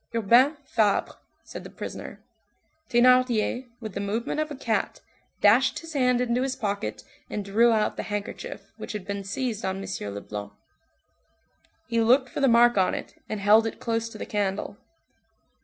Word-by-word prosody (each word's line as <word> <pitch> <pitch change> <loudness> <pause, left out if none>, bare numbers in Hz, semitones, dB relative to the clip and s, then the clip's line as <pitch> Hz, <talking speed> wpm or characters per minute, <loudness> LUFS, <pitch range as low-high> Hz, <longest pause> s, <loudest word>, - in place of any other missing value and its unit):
"Urbain 240 +7 +4
Fabre," 215 -6 +1 0.3
said - - -9
the - - -9
prisoner. - - -8 0.7
Thénardier, 250 0 +3
with 220 -4 -7
the 200 - -4
movement 220 +8 -2
of 310 0 -1
a 295 - -6
cat, 230 -4 -1 0.4
dashed 225 +6 +5
his 330 -1 -8
hand 250 -3 +2
into 245 0 +1
his 265 0 -1
pocket 200 - -3 0.3
and 205 -1 -4
drew 225 +4 +4
out 215 -1 +1
the - - -1
handkerchief 205 -1 -6
which - - -7
had 210 -3 -5
been 200 0 -4
seized 220 +2 -3
on 190 0 -2
M. 190 - -5
Leblanc. 100 0 -7 1.3
He 230 0 +1
looked 255 +3 +4
for - - -5
the 275 - +4
mark 240 -2 +5
on 185 - +2
it, - - -7 0.2
and 215 - -3
held 215 +3 +5
it 225 - -6
close 230 0 -1
to - - -10
the - - -5
candle. 205 0 -2
225 Hz, 170 wpm, -26 LUFS, 200-250 Hz, 1.3 s, dashed